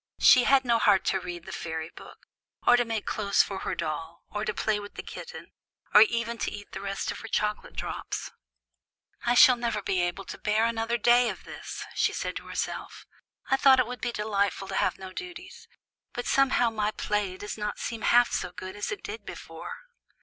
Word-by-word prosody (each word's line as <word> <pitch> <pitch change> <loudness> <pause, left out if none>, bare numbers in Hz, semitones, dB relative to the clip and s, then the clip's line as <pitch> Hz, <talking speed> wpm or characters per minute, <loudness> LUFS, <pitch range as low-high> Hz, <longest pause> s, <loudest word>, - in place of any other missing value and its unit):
She 250 - +7
had 270 -1 +4
no 235 -1 +3
heart 205 -3 +4
to 190 - +1
read 175 -2 -7
the - - -8
fairy 160 -1 -5
book, - - -14 0.4
or 245 - +7
to 245 - +3
make 225 -2 -3
clothes 200 -2 +2
for 195 -1 -5
her - - -3
doll, 160 +2 -4
or 210 0 -3
to 215 - 0
play 215 0 0
with 205 0 -10
the - - -6
kitten, 485 - -9 0.4
or 210 - +9
even 235 +1 +2
to - - -1
eat 205 0 -9
the - - -6
rest 195 0 -3
of - - -7
her 225 - -8
chocolate 210 -1 -2
drops. - - -4 1.0
"I 240 - +4
shall 255 -1 +8
never 235 -3 -1
be 190 -2 0
able 175 +2 -2
to - - -8
bear 215 +2 +2
another 230 0 0
day 240 +2 +5
of - - -7
this," - - -7
she - - +1
said - - -3
to - - -9
herself; - - -4 0.5
"I 270 - +5
thought 265 -1 +6
it 255 - +4
would 250 +2 -7
be 240 - -1
so 220 -3 -3
delightful 200 -2 0
to 195 - -3
have - - +1
no 190 -1 -9
duties, 360 - -9 0.5
but 245 - -4
somehow 260 -3 +3
my 210 -1 0
play 205 -3 -2
does 205 - -6
not 210 -1 -3
seem 230 -1 -4
half 245 0 +5
so 180 - -2
good 185 +2 -8
as 205 - -3
it 410 - -5
did 435 +1 -6
before." 475 - -8
215 Hz, 215 wpm, -28 LUFS, 195-240 Hz, 1.0 s, or